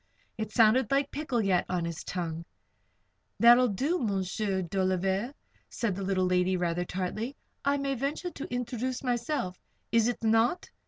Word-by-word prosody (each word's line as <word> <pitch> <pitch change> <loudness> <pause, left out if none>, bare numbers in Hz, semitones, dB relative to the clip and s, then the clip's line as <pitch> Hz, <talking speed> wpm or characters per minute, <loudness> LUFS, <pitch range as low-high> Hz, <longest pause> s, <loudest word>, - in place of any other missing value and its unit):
It 220 -1 -4
sounded 230 +3 +4
like 275 0 +1
"Pickle 270 -6 -1
yet" 185 -3 +2
on 180 -2 -1
his 170 -1 -5
tongue. 170 -2 -4 1.0
"That 235 +1 +9
will 250 0 +4
do, 275 - 0
M'sieur 195 -2 -1
Dolliver," 190 +5 0 0.4
said 230 -5 -1
the 195 - -5
little 190 -1 +1
lady, 180 0 +2
rather 175 0 -1
tartly. 200 +9 -3 0.3
"I 280 +1 +2
may 275 -1 -1
venture 280 +7 -3
to 280 - -8
introduce 245 +1 -3
myself 240 -6 -1 0.3
is 230 -1 +4
it 245 -1 -2
not?" 225 +8 +2
220 Hz, 155 wpm, -29 LUFS, 185-250 Hz, 1.0 s, That